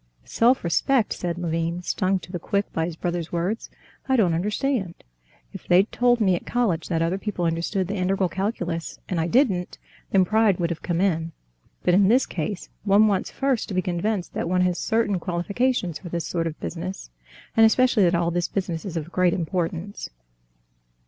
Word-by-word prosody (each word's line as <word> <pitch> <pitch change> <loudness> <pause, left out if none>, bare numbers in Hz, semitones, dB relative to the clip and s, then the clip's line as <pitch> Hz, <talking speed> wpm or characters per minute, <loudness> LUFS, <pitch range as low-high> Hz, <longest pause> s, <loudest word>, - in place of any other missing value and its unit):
"Self 245 +3 +2
respect!" 220 - +2
said 175 -1 -3
Levin, 170 0 -2
stung 190 +1 0
to 180 - -11
the 175 - -4
quick 200 +3 -2
by 160 - 0
his 170 -1 -5
brother's 175 -1 -3
words; 180 +6 -2 0.4
"I 265 - +4
don't 190 -9 +3
understand. 205 +2 -1 0.6
If - - -10
they'd 185 +4 +4
told 245 0 +3
me 190 -4 +3
at - - -5
college 210 -10 0
that 165 -2 0
other 175 +4 -1
people 195 -4 -2
understood 170 +3 -1
the 200 - -3
integral 190 +1 +1
calculus, 175 -3 -3
and 175 -3 -1
I 160 - 0
didn't, 195 -6 +1 0.3
then 190 -2 +4
pride 215 -1 +3
would 170 -1 0
have 165 - -4
come 175 -1 -1
in. 165 -4 0 0.5
But 180 - +3
in 195 +1 +5
this 250 +5 +4
case 180 +3 -4 0.2
one 205 +1 +5
wants 200 -3 +1
first 270 -4 -1
to 195 - -5
be 185 - +2
convinced 185 +1 -2
that - - -2
one 180 0 +2
has 180 -1 +1
certain 220 -4 +1
qualifications 180 - -1
for 175 - -9
this 170 -1 -3
sort 165 -1 -1
of 160 - -6
business, 175 - -6 0.4
and 225 - +6
especially 245 0 +4
that 175 -2 +4
all 170 0 +1
this 175 0 0
business 180 -4 -3
is 175 -4 -4
of 165 +1 -5
great 180 -2 +2
importance." 175 +2 -3
180 Hz, 190 wpm, -24 LUFS, 170-205 Hz, 0.6 s, and